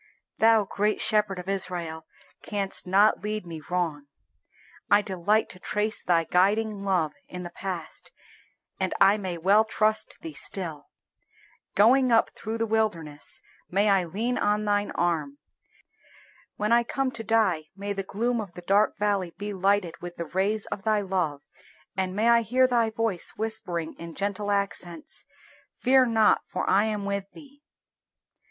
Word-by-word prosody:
Thou, 225 -1 +5
Great 210 +2 0
Shepherd 210 -3 +1
of 180 0 -7
Israel, 175 -5 -2 0.3
canst 200 -3 -3
not 200 +4 +4
lead 210 -2 -3
me 165 -2 -7
wrong. 165 -5 -2 0.8
I 205 0 +5
delight 205 +2 +1
to 185 - -9
trace 210 +3 -1
Thy 170 -2 +3
guiding 200 +4 +1
love 180 -6 +1
in 180 0 -7
the 175 - -7
past, 175 -3 -6 0.7
and 190 -1 -1
I 195 +1 +6
may 185 -4 -4
well 195 +6 +4
trust 215 -1 0
Thee 325 -2 -7
still; 165 - -3 0.9
going 245 +6 +5
up 225 - +4
through 220 +2 -5
the 225 - 0
wilderness 175 -10 -2 0.3
may 200 +3 +2
I 190 -2 +3
lean 225 +9 -2
on 210 +1 +1
Thine 205 0 +1
arm; 175 - -1 1.2
when 210 +2 -1
I 235 0 +6
come 260 +2 -1
to 230 - -7
die 210 -8 +2
may 200 +1 -3
the 195 - -3
gloom 230 +5 -1
of 190 -5 -9
the 180 - -9
dark 200 +4 +2
valley 200 -4 0
be 205 0 -4
lighted 195 -2 0
with 175 0 -7
the 170 - -4
rays 195 +5 0
of - - -3
Thy 215 0 +1
love, 180 -7 -1 0.5
and 185 0 -2
may 215 +3 +2
I 235 0 +6
hear 255 +3 +3
Thy 240 -3 +2
voice 220 -5 -1
whispering 185 -7 -2
in 170 -1 -8
gentle 205 +1 -2
accents, 195 -5 -2 0.5
"Fear 260 0 +4
not, 220 -2 +4
for 185 - -3
I 200 +3 +4
am 210 -2 -2
with 200 -1 -2
thee." 285 -2 -15
200 Hz, 160 wpm, -26 LUFS, 180-220 Hz, 1.2 s, I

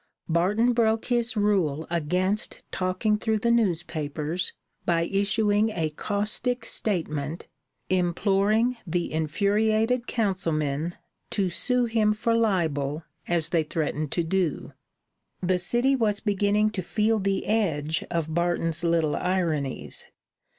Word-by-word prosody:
Barton 205 +9 +2
broke 225 -1 +2
his 240 -1 0
rule 180 -8 +1
against 180 +5 -1
talking 185 +4 0
through 220 0 +1
the 235 +3 +1
newspapers 165 -5 -1 0.3
by 170 -1 +2
issuing 205 +3 +2
a 165 -7 -2
caustic 215 +7 -2
statement 160 -8 -2 0.4
imploring 195 +6 +2
the 175 -1 -2
infuriated 215 +9 +1
councilmen 165 - -1 0.3
to 190 -4 0
sue 250 +6 +2
him 220 -2 +2
for 230 +2 0
libel 160 -9 0 0.2
as 170 -2 +1
they 165 - +2
threatened 155 -1 -2
to 170 - +1
do. 170 -2 -1 0.7
The 180 0 +1
city 240 +9 +2
was 215 -5 +1
beginning 205 0 +1
to 200 - -3
feel 215 +4 +1
the 195 0 -1
edge 160 -8 0
of 165 -2 -2
Barton's 170 -1 +1
little 165 -3 +2
ironies. 165 -7 -2
190 Hz, 115 wpm, -26 LUFS, 165-215 Hz, 0.7 s, Barton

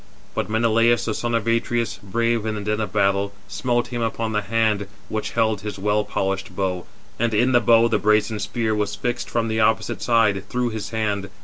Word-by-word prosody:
But - - -2
Menelaus, 115 +1 +3
the 110 - -1
son 120 +2 -1
of 115 -2 0
Atreus, 115 0 0
brave 115 +2 0
in 110 - -1
the 105 - -4
din 105 +1 -1
of 105 - -3
battle, 100 -1 +1
smote 120 -2 -1
him 120 -1 -3
upon 115 0 -1
the 105 -1 0
hand 105 -1 0 0.2
which 110 0 -3
held 110 -3 +1
his 105 -1 -5
well 105 +2 +1
polished 95 -2 -3
bow; 90 -2 -2 0.3
and 115 -1 +1
in 125 +5 +3
the 120 - +5
bow 115 0 +5
the - - +1
brazen 105 +1 +2
spear 110 +2 -1
was 105 -1 -1
fixed 120 0 -3
from 115 -1 0
the 110 0 -1
opposite 110 0 +1
side, 105 -5 +2
through 125 -1 0
his 110 -2 -5
hand. 105 -3 -2
110 Hz, 205 wpm, -22 LUFS, 105-115 Hz, 0.3 s, the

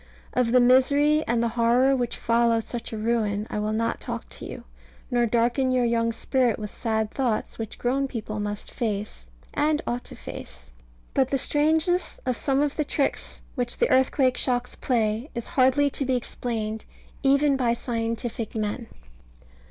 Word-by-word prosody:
Of 250 -2 +2
the 250 - +6
misery 285 +5 +4
and 235 0 +1
the 235 - +1
horror 240 +4 +3
which 245 -2 -2
follow 230 0 +2
such 235 +1 -5
a 220 - -4
ruin 215 -2 0
I 210 - -1
will 210 +1 -1
not 225 +1 -1
talk - - -5
to - - -9
you, - - -8 0.5
nor 240 -1 +3
darken 240 +3 +2
your 250 -1 +2
young 230 0 +1
spirit 245 0 +1
with 210 -1 -6
sad 220 -2 -1
thoughts 245 -5 -1
which 220 -1 -5
grown 270 +3 0
people 215 -4 -5
must 205 0 -4
face, 205 - -3 0.3
and 300 +1 +2
ought 240 +1 -2
to - - -7
face. 60 0 -9 0.4
But 265 -2 +2
the 275 - +1
strangeness 320 +6 +1
of 255 -1 +1
some 275 +3 +1
of 290 -1 -2
the 305 - +2
tricks 285 -1 -1
which 245 -3 -2
the - - +2
earthquake 260 0 +3
shocks 245 -1 0
play 225 +1 0
is 235 - -3
hardly 265 +2 +4
to 275 - -2
be 260 -1 +1
explained, 220 -3 -3 0.4
even 280 +1 +4
by 245 -3 +2
scientific 230 -1 -3
men. 215 +2 -2
240 Hz, 170 wpm, -25 LUFS, 225-265 Hz, 0.5 s, the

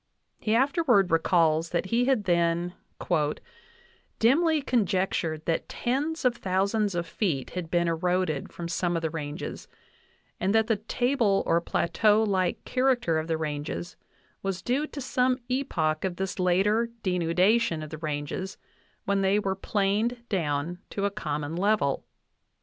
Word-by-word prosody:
He 215 0 +1
afterward 260 - +3
re 165 - +5
calls 165 -1 +2
that 175 0 -1
he 245 +1 +3
had 260 -5 +2
then 170 -1 +1 1.4
"dimly 305 +6 +3
conjectured 190 - 0
that 165 - -1
tens 285 +5 -2
of 240 -1 +1
thou 190 +1 +1
sands 205 -2 0
of 170 -1 -1
feet 165 - -2
had 180 -3 -5
been 170 0 +2
eroded 170 -2 0
from 170 - -6
some 170 +1 -1
of 165 - -2
the 160 - -1
ranges, 150 +1 -5 0.7
and 195 +3 +1
that 220 0 +4
the 225 -1 +1
table 230 -1 +1
or 170 - +2
plateau 210 +6 +2
like 190 -4 0
character 255 -11 +1
of 155 - -4
the 165 -1 0
ranges 150 +3 -4 0.5
was 195 -2 -3
due 275 +5 0
to 290 - -8
some 255 0 +1
epoch 165 - 0
of 185 -2 -1
this 190 0 -4
later 200 +6 +2
denudation 180 +1 +2
of 155 - -8
the 155 - -6
ranges 155 +4 -4 0.5
when 200 0 +1
they 195 +1 +3
were 195 -2 0
planed 215 +5 -1
down 165 -2 -1
to 200 - -2
a 200 - +1
common 150 -6 -3
level. 195 -7 +1
190 Hz, 150 wpm, -27 LUFS, 165-225 Hz, 1.4 s, re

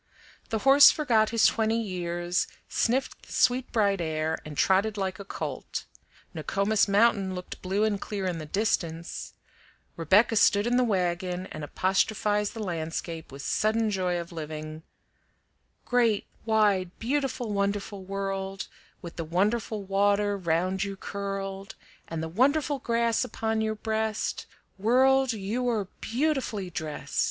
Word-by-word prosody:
The 220 - 0
horse 280 +1 +9
forgot 230 -8 +2
his 230 -1 +3
twenty 225 0 +2
years, 175 -3 -2 0.2
sniffed 255 +3 0
the - - -14
sweet 255 +1 +2
bright 200 -4 +2
air, 160 -1 -1
and 150 -2 -9
trotted 200 +3 +2
like 190 0 -2
a - - -6
colt; 195 - -5 0.5
Nokomis 200 +2 +1
Mountain 200 -2 +3
looked 180 0 -8
blue 195 +3 0
and 210 -2 0
clear 200 -2 -4
in 175 -3 -2
the 155 - -7
distance; 170 -4 -2 0.6
Rebecca 200 +8 +4
stood 205 0 +4
in 240 +1 +1
the 250 - +4
wagon, 180 -3 -1
and 155 - -6
apostrophized 205 +5 0
the 225 - -4
landscape 165 -2 -4
with 140 +1 -8
sudden 220 0 +1
joy 180 -3 0
of 170 0 -7
living: 155 -1 -6 1.0
"Great, 235 -4 +2 0.2
wide, 205 -5 +2
beautiful, 255 -3 -1
wonderful 200 0 -2
World, 195 0 -4 0.4
With 170 - -8
the 165 - -2
wonderful 205 +5 0
water 200 +1 +2
round 185 +1 0
you 200 0 -4
curled, 195 +1 -5 0.3
And 165 -1 -4
the - - -2
wonderful 275 - +2
grass 235 -2 +1
upon 220 0 -2
your 220 0 -1
breast, 220 0 -2 0.3
World, 260 +4 +4
you 225 +5 -2
are 210 -5 -1
beautifully 240 - -1
drest!" 155 -4 -4
200 Hz, 140 wpm, -27 LUFS, 180-225 Hz, 1.0 s, horse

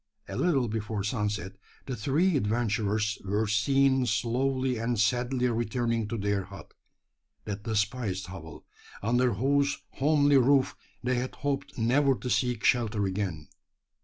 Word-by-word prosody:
A - - -6
little 140 -9 +2
before 105 -1 -3
sunset 105 -3 -2 0.3
the 130 - -4
three 150 - +1
adventurers 110 -2 0
were 105 +3 0
seen 130 +5 +2
slowly 125 +3 0
and 115 -1 -1
sadly 125 +3 +1
returning 115 -1 -1
to 115 +2 -3
their 100 -2 -1
hut 95 0 -12 0.7
that 100 -1 -4
despised 105 -3 -1
hovel, 85 -4 -10 0.4
under 120 +2 +2
whose 140 +5 +1
homely 145 0 +3
roof 135 +1 +3 0.3
they 125 0 +1
had 130 +1 -4
hoped 140 -1 -2
never 135 +4 +3
to 125 0 -5
seek 125 -4 0
shelter 110 -4 +2
again! 95 -6 -3
115 Hz, 135 wpm, -28 LUFS, 105-130 Hz, 0.7 s, homely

